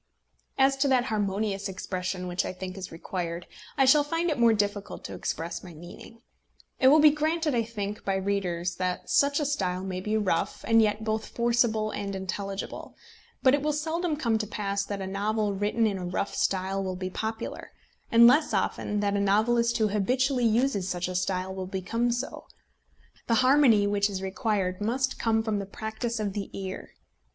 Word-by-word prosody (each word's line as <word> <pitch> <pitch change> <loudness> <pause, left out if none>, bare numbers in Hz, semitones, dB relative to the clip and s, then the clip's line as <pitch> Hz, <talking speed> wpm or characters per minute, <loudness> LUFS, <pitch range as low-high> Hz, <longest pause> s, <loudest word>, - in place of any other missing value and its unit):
As 270 0 +4
to 275 +1 +2
that 260 -2 +3
harmonious 200 -1 -1
expression 185 -1 -4
which 180 +1 -1
I - - -4
think 185 0 -7
is 190 -2 -7
required, 170 0 -4 0.3
I 270 - +5
shall 290 +3 +6
find 330 +3 -1
it 290 - -2
more 235 -1 +6
difficult 205 -1 -2
to - - -7
express 165 +1 -4
my 175 -3 -11
meaning. 175 +8 -12 0.6
It 260 - +5
will 300 +4 +7
be 305 0 +8
granted, 310 +1 0
I 235 - +2
think, 210 -2 -5
by 195 - 0
readers 185 -3 -1
that 180 -1 -2
a 285 +1 +3
style 185 -10 -1
may 185 -1 -4
be 215 +3 0
rough, 185 -6 -1
and 225 0 +5
yet 210 0 +1
both 220 0 -2
forcible 235 -2 +1
and 200 -1 -4
intelligible; 195 +1 -5 0.5
but 260 - +6
it 285 - +2
will 300 +1 +1
seldom 320 +2 -1
come 230 -6 +1
to 215 - -3
pass 200 -1 -2
that 200 -1 -4
a - - -3
novel 205 +2 -1
written 205 +3 +1
in 200 -3 0
a 180 - -4
rough 185 +2 -2
style 195 +1 0
will 185 -1 -3
be 185 0 -4
popular, 220 +3 -5 0.4
and 230 0 +8
less 290 +6 +5
often 210 0 -1
that 205 0 0
a - - +1
novelist 235 +4 +2
who 220 -1 +2
habitually 250 +5 +1
uses 220 -4 +1
such 175 0 -2
a - - -4
style 185 +1 -1
will 190 -1 -5
become 230 +6 -1
so. 245 +3 -4 0.8
The 230 - +3
harmony 255 -7 +5
which 205 0 +1
is 190 -1 -4
required 190 -1 -1
must 260 +5 -1
come 225 -1 +1
from 215 -2 -1
the 200 - -5
practice 220 +3 -4
of 205 -2 -2
the 200 -1 -4
ear. 190 -1 -7
210 Hz, 190 wpm, -27 LUFS, 190-235 Hz, 0.8 s, be